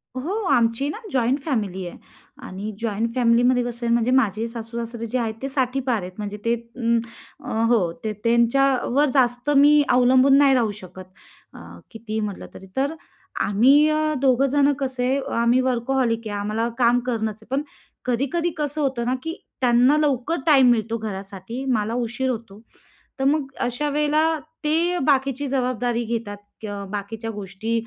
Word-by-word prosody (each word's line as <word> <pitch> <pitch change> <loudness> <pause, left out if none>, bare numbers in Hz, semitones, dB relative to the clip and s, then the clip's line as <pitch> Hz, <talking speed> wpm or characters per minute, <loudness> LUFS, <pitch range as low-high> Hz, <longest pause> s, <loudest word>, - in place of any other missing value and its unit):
हो, 285 +9 -3 0.2
आमची 230 +4 +2
ना 300 - -5
जॉइंट 255 +2 +1
फॅमिली 205 - -2
आहे - - -9 0.5
आणि 200 +3 -6
जॉइंट 230 +1 -2
फॅमिलीमध्ये 245 +1 +3
कसं 240 0 -5
आहे, 235 - +2
म्हणजे 235 +1 +2
माझे 225 -4 +2
सासू-सासरे 230 0 -6
जे 245 +3 -2
आहेत, 225 -2 -2
ते 270 - -3
60ठी 265 -1 0
पार 250 -5 -1
आहेत. 180 +1 -7
म्हणजे 210 0 -5
ते 230 - +3 0.9
अ, - - -5 0.2
हो. 200 -8 +2
ते 215 -1 -2
त्यांच्यावर 260 +4 +2
जास्त 245 +1 +1
मी 295 +1 +6
अवलंबून 255 +2 +5
नाही 280 -1 +5
राहू 230 -4 +1
शकत, 185 0 -11 0.5
अ, - - -11 0.3
कितीही 220 -1 -5
म्हटलं 210 -3 -4
तरी. 190 - -12
तर 280 +4 0 0.5
आम्ही 265 +9 +5
अ, 310 0 +1
दोघंजणं 275 +2 +3
कसे, 260 -1 -1 0.3
आम्ही 240 +2 +3
वर्कहॉलिक 240 -2 0
आहे, 205 -1 -4
आम्हाला 215 +3 -1
काम 245 -1 +4
करणंच 220 -3 -2
आहे. 265 - -4
पण 285 - 0 0.4
कधी-कधी 275 +8 0
कसं 300 0 -2
होतं 260 -4 -1
ना, 255 - 0
की 325 - -3 0.3
त्यांना 250 +4 +4
लवकर 300 +1 0
टाईम 270 -5 +6
मिळतो 230 -1 0
घरासाठी, 200 +2 -6
मला 225 -4 0
उशीर 245 +2 -2
होतो. 220 -4 -6 0.6
तर 265 - -1
मग 290 0 +2
अशा 245 +5 -1
वेळेला 305 +2 +1 0.3
ते 330 +4 +2
अ, 355 - -1
बाकीची 275 -1 +1
जबाबदारी 245 -2 -1
घेतात, 225 -3 -4 0.3
क - - -5 0.3
बाकीच्या 220 +3 -5
गोष्टी 205 +1 -5
245 Hz, 160 wpm, -23 LUFS, 225-270 Hz, 0.9 s, मी